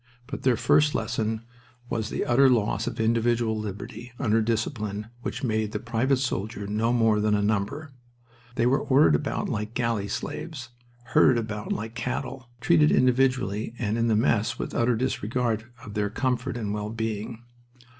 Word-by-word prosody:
But 140 +2 -6
their 125 -3 +3
first 150 +5 +3
lesson 110 0 -1 0.4
was 110 -2 -2
the - - -2
utter 135 +3 +5
loss 115 -5 +1
of - - -4
individual 115 0 +2
liberty 110 +3 -6
under 115 -5 +2
a - - +1
discipline 110 -2 -2
which 125 +2 -5
made 110 -3 0
the 105 - -1
private 120 +4 +1
soldier 110 -5 -3
no 110 +3 0
more 115 -3 +3
than 105 0 +2
a 105 - +1
number. 110 +9 -1 0.6
They 115 -2 +2
were 130 +3 +3
ordered 135 - +4
about 75 - -1
like 105 +2 -3
galley 115 -4 0
slaves, 135 - -5 0.4
herded 130 - +6
about 105 -2 -4
like 110 +1 -3
cattle, 125 +1 -4
treated 75 -7 +4
individually 125 - +2
and 110 -2 -1
in 115 0 +1
the 110 - +3
mass 110 0 +1
with - - -4
utter 120 +1 +2
disregard 115 -1 -1 0.2
of 105 - -8
their 105 -1 0
comfort 125 +2 -1
and 105 -3 -3
well 105 0 -3
being. 110 +1 -4
115 Hz, 165 wpm, -26 LUFS, 105-125 Hz, 0.6 s, herded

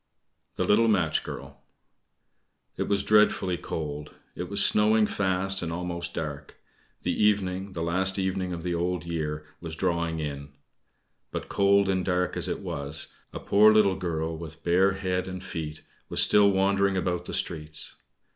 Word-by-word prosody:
THE - - 0
LITTLE 115 +3 +4
MATCH 90 -8 +2
GIRL - - -9 1.1
It - - -2
was 100 -1 +2
dreadfully 105 -4 +3
cold, 75 -2 -5 0.2
it - - -6
was - - +3
snowing 105 +1 +4
fast, 95 -1 0
and 85 -2 -3
almost 85 0 -4
dark; 75 -2 -5 0.5
the - - 0
evening 95 -2 +1
the 85 - -3
last 95 +3 0
evening 95 -1 -1
of 85 -2 -5
the 90 -1 -1
Old 85 0 -1
Year 75 -2 -3
was 80 -2 -6
drawing 85 -2 -1
in. 70 -2 -5 0.8
But - - -5
cold 100 0 +3
and 95 -1 +1
dark 90 -1 0
as - - 0
it - - -3
was, 70 +2 -2 0.2
a - - -6
poor 105 +2 +5
little 105 -3 +4
girl, 80 -3 -2
with 80 -1 -9
bare 95 +3 +3
head 95 -1 -2
and 95 0 -6
feet, 75 -2 -6 0.3
was - - -2
still 105 -1 +6
wandering 100 0 +2
about 90 -1 -1
the - - -6
streets. 75 -2 -3
90 Hz, 160 wpm, -27 LUFS, 80-95 Hz, 1.1 s, still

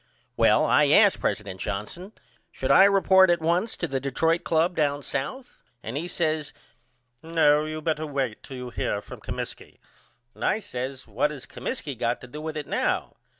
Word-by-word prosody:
Well - - +4
I - - +4
asked - - +5
president 100 -3 -3
Johnson 175 - -5 0.4
should - - -2
I 190 - +8
report 190 -1 +5
at 175 0 +3
once 170 +7 0
to 175 - -2
the 135 -3 -2
Detroit 160 +5 0
Club 165 +2 +1
down 145 -2 0
south 245 - -4 0.2
and 115 - -5
he 160 +5 -3
says 155 -4 -1 0.7
No 155 -2 +3
you 155 0 -5
better 155 -1 -1
wait 135 -6 -2
till 130 - -9
you 125 0 -6
hear 105 - -2
from - - -11
Comiskey - - -7 0.6
and - - -9
I - - +2
says 130 - -5
What 115 +7 0
has 145 -4 -8
Comiskey 195 - -4
got 120 +1 -1
to 130 - -10
do 150 +5 -8
with 155 0 -5
it 150 - -4
now? - - -1
150 Hz, 180 wpm, -25 LUFS, 130-170 Hz, 0.7 s, I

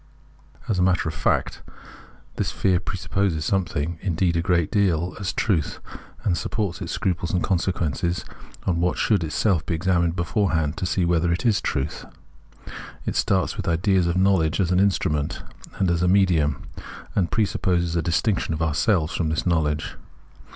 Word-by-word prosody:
As 105 -5 0
a - - +3
matter 90 -3 +2
of 80 - -2
fact, - - 0 0.7
tkis - - -1
fear 95 -2 +1
presupposes 95 -3 -1
sometking, 85 -4 -1
indeed 90 -2 0
a 85 - +2
great 85 -3 +1
deal, 90 -4 +1
as 95 -1 -2
trutk, 90 -9 0 0.5
and 95 - +1
supports 95 +2 -3
its 85 - -4
scruples 90 -4 -1
and 90 - 0
consequences 85 -2 -1 0.4
on 90 -3 +1
wkat 90 +1 +1
skould 105 -6 +2
itself 80 +2 +1
be 85 - -2
examined 85 0 +1
beforekand 85 -3 0
to 90 - -2
see 90 0 +1
wketker 85 0 +2
it 90 +9 -3
is 110 -3 +3
trutk. 75 0 -3 0.9
It - - -2
starts 95 -2 +1
witk - - -5
ideas 90 +2 +2
of 85 - 0
Imow 95 0 +4
ledge 80 +2 0
as 90 -2 +1
an 90 - +3
instrument, 75 -7 0 0.3
and 95 -3 +2
as 85 -1 0
a 90 - +2
medium; 90 -7 +2 0.5
and 90 -3 +1
pre 110 - +2
supposes 85 -4 0
a 85 - +2
distinction 85 +1 0
of 80 - -5
ourselves 80 +1 +1
from 80 -3 0
tkis 80 - -1
know 85 -3 +3
ledge. 75 +1 -3
85 Hz, 170 wpm, -24 LUFS, 80-95 Hz, 0.9 s, Imow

